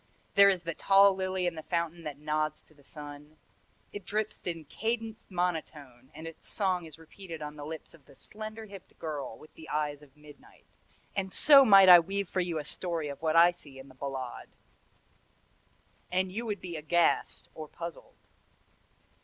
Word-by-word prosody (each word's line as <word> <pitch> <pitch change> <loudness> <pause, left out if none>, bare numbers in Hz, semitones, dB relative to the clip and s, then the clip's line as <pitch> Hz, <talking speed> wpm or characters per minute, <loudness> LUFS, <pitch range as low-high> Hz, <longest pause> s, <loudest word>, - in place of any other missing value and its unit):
There 200 0 +8
is 185 -3 0
the 165 0 -3
tall 195 +3 +5
lily 185 -1 -2
in 175 - 0
the 160 - -7
fountain 170 +1 -3
that 145 -2 -5
nods 155 0 -2
to - - -24
the 145 -2 -23
sun. 150 +1 -11 0.6
It 205 - -7
drips 215 +1 -3
in 165 -3 -4
cadenced 225 +5 -4
monotone 155 -8 -4
and 160 - -9
its 165 -1 -10
song 185 -4 -1
is 155 -2 -11
repeated 165 0 -10
on 150 0 -7
the 145 -1 -8
lips 160 -1 -8
of 155 -5 -20
the 140 - -18
slender 215 +5 -8
hipped 195 -3 -13
girl 145 -7 -5
with 155 - -17
the 160 - -13
eyes 150 -1 -2
of 145 -1 -19
midnight 150 -1 -17 0.5
and 190 -1 -2
so 280 +5 +8
might 195 -5 +8
I 180 -1 +11
weave 195 +3 -3
for 185 - -2
you 175 -2 -2
a 150 - -4
story 165 -2 -3
of 140 - -8
what 160 0 0
I 170 +1 +7
see 145 -6 -15
in 135 +1 -12
the - - -15
Ballade 130 -2 -6 1.6
and 185 +1 0
you 230 +4 -4
would 205 -3 -3
be 175 -2 -6
aghast 165 +3 +1
or 155 -1 -8
puzzled. 170 +1 -9
165 Hz, 185 wpm, -30 LUFS, 150-190 Hz, 1.6 s, I